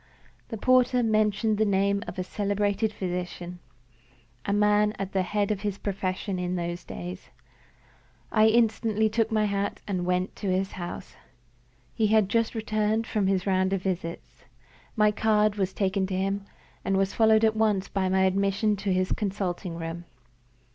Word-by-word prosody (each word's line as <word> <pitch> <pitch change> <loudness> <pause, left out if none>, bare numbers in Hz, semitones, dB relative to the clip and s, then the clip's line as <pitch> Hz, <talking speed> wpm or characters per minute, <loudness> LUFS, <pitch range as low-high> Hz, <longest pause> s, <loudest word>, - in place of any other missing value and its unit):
The 225 - -4
porter 255 +1 +3
mentioned 215 -1 +1
the - - +4
name 200 0 +1
of - - -7
a 185 - -1
celebrated 205 +2 -1
physician 180 -2 -5 0.9
a - - +1
man 210 +1 +3
at 195 0 -4
the 190 - +1
head 205 +2 0
of 200 -2 -2
his 205 -2 -2
profession 190 -1 -3
in 180 0 -2
those 175 0 -3
days. 180 +2 -8 1.0
I 215 0 +5
instantly 220 -1 +2
took 225 +1 0
my 215 -1 +2
hat 200 0 -2
and 185 -3 -1
went 180 +1 -1
to 205 - -4
his 190 +1 0
house. 175 -2 -7 0.8
He 220 - +1
had 215 -2 +3
just 230 +1 +1
returned 215 0 0
from 210 -3 0
his 190 -1 +1
round 190 -1 +1
of 190 -2 -1
visits. 175 -3 -5 0.5
My 210 -2 +4
card 210 -1 +2
was 190 -2 0
taken 190 -1 0
to 185 - -3
him, 195 +1 -1 0.4
and 195 0 +1
was 195 0 +1
followed 220 -1 +4
at 220 0 +2
once 210 -3 +1
by 190 -2 -1
my 190 0 +3
admission 200 +2 +2
to 200 0 -2
his 185 0 +1
consulting 190 -4 -2
room. 165 +1 -6
200 Hz, 165 wpm, -27 LUFS, 185-215 Hz, 1.0 s, I